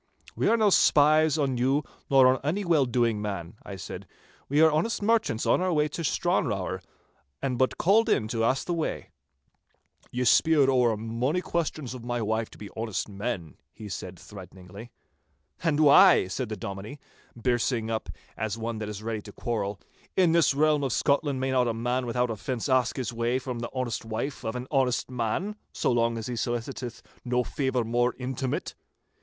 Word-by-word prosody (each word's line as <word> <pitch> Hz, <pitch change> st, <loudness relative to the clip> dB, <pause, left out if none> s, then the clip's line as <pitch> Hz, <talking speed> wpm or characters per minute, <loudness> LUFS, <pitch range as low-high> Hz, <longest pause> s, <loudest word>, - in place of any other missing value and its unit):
'We -, -, 0 dB
are 230 Hz, -, +4 dB
no 215 Hz, -2 st, +3 dB
spies 155 Hz, -1 st, +5 dB
on 135 Hz, -4 st, 0 dB
you 135 Hz, +4 st, +2 dB, 0.3 s
nor 135 Hz, -2 st, +6 dB
on 130 Hz, +1 st, +4 dB
any 185 Hz, +8 st, -1 dB
well 155 Hz, -6 st, +3 dB
doing 115 Hz, -3 st, +1 dB
man,' 100 Hz, -5 st, -4 dB
I 100 Hz, -, -7 dB
said. 95 Hz, -, -8 dB, 0.4 s
'We 145 Hz, +3 st, +3 dB
are 160 Hz, 0 st, +6 dB
honest 205 Hz, +9 st, 0 dB
merchants 215 Hz, -, +1 dB
on -, -, +3 dB
our 185 Hz, 0 st, +1 dB
way 150 Hz, -2 st, +2 dB
to 165 Hz, +3 st, -5 dB
Stranrawer, 105 Hz, -, 0 dB, 0.6 s
and 130 Hz, -3 st, -2 dB
but 130 Hz, -, +1 dB
called 210 Hz, +6 st, +3 dB
in 110 Hz, -, +2 dB
to 115 Hz, -1 st, -1 dB
ask 130 Hz, +4 st, +1 dB
the 175 Hz, -, -1 dB
way.' 165 Hz, -2 st, -3 dB, 1.0 s
'Ye 125 Hz, +1 st, -2 dB
speered 140 Hz, +4 st, +4 dB
ower 120 Hz, -4 st, +3 dB
mony 115 Hz, +9 st, -1 dB
questions 155 Hz, -7 st, -3 dB
of 125 Hz, -2 st, -8 dB
my 120 Hz, 0 st, -2 dB
wife 110 Hz, 0 st, -1 dB
to -, -, -15 dB
be 105 Hz, -, -9 dB
honest 110 Hz, -2 st, -3 dB
men,' 100 Hz, -, -5 dB, 0.2 s
he 110 Hz, -, -9 dB
said -, -, -6 dB
threateningly. 100 Hz, +5 st, -11 dB, 0.7 s
'And 155 Hz, -3 st, +1 dB
why,' 155 Hz, -, +7 dB
said 125 Hz, +4 st, -3 dB
the 110 Hz, -, -4 dB
Dominie, 100 Hz, +7 st, -6 dB, 0.4 s
birsing 120 Hz, -1 st, 0 dB
up 110 Hz, -, -3 dB, 0.3 s
as 110 Hz, 0 st, -3 dB
one 115 Hz, 0 st, -4 dB
that 105 Hz, -1 st, -4 dB
is 105 Hz, 0 st, -7 dB
ready 110 Hz, -1 st, -3 dB
to 105 Hz, -, -11 dB
quarrel, 100 Hz, -4 st, -3 dB, 0.4 s
'in 180 Hz, -3 st, +5 dB
this 165 Hz, -4 st, +3 dB
realm 150 Hz, 0 st, +3 dB
of 135 Hz, -4 st, 0 dB
Scotland 140 Hz, -1 st, +1 dB
may 130 Hz, 0 st, -1 dB
not 125 Hz, -2 st, +2 dB
a 115 Hz, -, -1 dB
man 125 Hz, +2 st, -1 dB
without 125 Hz, 0 st, 0 dB
offence 115 Hz, +2 st, -3 dB
ask 130 Hz, -3 st, +2 dB
his 125 Hz, -2 st, -3 dB
way, 120 Hz, +2 st, 0 dB
from 125 Hz, -2 st, -5 dB
the 120 Hz, -, -4 dB
honest 130 Hz, -3 st, -3 dB
wife 115 Hz, +5 st, -4 dB
of 110 Hz, -, -3 dB
an 125 Hz, 0 st, -4 dB
honest 130 Hz, -3 st, +1 dB
man, 125 Hz, -, -2 dB, 0.2 s
so -, -, 0 dB
long 115 Hz, -1 st, +1 dB
as 110 Hz, -, -5 dB
he 125 Hz, -, -4 dB
soliciteth 120 Hz, +1 st, -4 dB, 0.2 s
no 125 Hz, 0 st, +1 dB
favour 130 Hz, -2 st, -1 dB
more 120 Hz, +2 st, +1 dB
intimate? 130 Hz, 0 st, -3 dB
125 Hz, 185 wpm, -27 LUFS, 115-145 Hz, 1.0 s, why